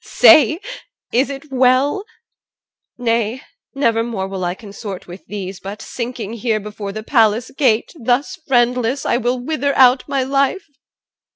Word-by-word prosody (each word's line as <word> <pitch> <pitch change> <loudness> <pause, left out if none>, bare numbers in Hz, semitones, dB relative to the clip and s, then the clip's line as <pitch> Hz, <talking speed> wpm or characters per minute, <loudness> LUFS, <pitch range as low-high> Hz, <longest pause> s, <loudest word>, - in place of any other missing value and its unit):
Say, 310 - +6 0.5
is 255 +4 +2
it 275 +1 -8
well? 265 +9 +2 0.9
Nay, 235 0 -1 0.3
nevermore 230 -6 0
will 190 -1 -5
I 175 0 -1
consort 200 -2 -8
with 180 +2 -11
these, 195 -1 -6
But 200 +2 -7
sinking 235 -3 -5
here 225 -1 -1
before 205 -1 -7
the 215 +2 -6
palace 225 -1 +2
gate, 245 -5 +1
Thus, 255 +9 +1
friendless, 250 0 +1
I - - +2
will 245 +1 0
wither 280 +1 -1
out 255 0 +6
my 275 -2 0
life. 275 +7 0
240 Hz, 135 wpm, -18 LUFS, 215-270 Hz, 0.9 s, Say